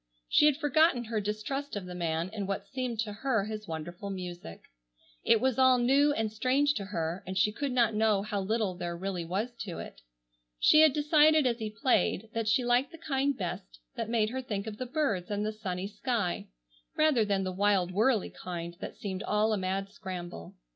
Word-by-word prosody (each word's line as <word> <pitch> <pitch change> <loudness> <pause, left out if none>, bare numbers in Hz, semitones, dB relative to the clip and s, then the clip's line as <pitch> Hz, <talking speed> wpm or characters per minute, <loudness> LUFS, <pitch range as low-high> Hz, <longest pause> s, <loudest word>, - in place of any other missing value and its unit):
She 300 - +5
had 290 -2 +3
forgotten 300 -3 +3
her 225 -2 -2
distrust 215 +8 -3
of 200 -2 -4
the 180 - -7
man 170 0 -2
in 205 -3 -3
what 195 - -3
seemed 255 -4 -4
to 210 -2 -4
her 225 -1 0
his 215 -1 -6
wonderful 175 +5 -6
music. 175 - -7 0.6
It 230 - +4
was 260 0 +1
all 260 -1 +6
new 275 +4 +4
and 220 -4 -1
strange 260 +6 +2
to 200 -6 -4
her, 170 -2 -3
and 190 0 -4
she 210 +3 +3
could 275 +5 -3
not 235 -3 +3
know 210 -2 +2
how 205 -1 -2
little 215 -1 0
there 175 -1 -5
really 185 -1 -3
was 195 +8 -2
to 190 -4 -5
it. - - -9 0.6
She 305 - +6
had 315 -2 +7
decided 300 +1 +4
as 240 -1 +1
he 220 -1 -3
played 220 -2 +1
that 225 -1 -2
she 240 +3 +2
liked 245 +3 +2
the 330 - -10
kind 280 -4 0
best - - -5 0.2
that - - -3
made 220 -2 +1
her 260 +1 -3
think 210 -5 -4
of 215 -1 -7
the 255 - -3
birds 240 - -1
and 205 0 -1
the 215 - -2
sunny 190 -4 -4
sky, 210 -2 -2 0.5
rather 305 -7 +4
than 200 -2 0
the 185 - -2
wild 190 -1 +2
whirlly 220 +2 +2
kind 170 -1 -6
that - - -7
seemed 190 -2 -4
all 215 0 +1
a - - +1
mad 195 +1 -2
scramble. 175 - -7
215 Hz, 205 wpm, -30 LUFS, 190-255 Hz, 0.6 s, had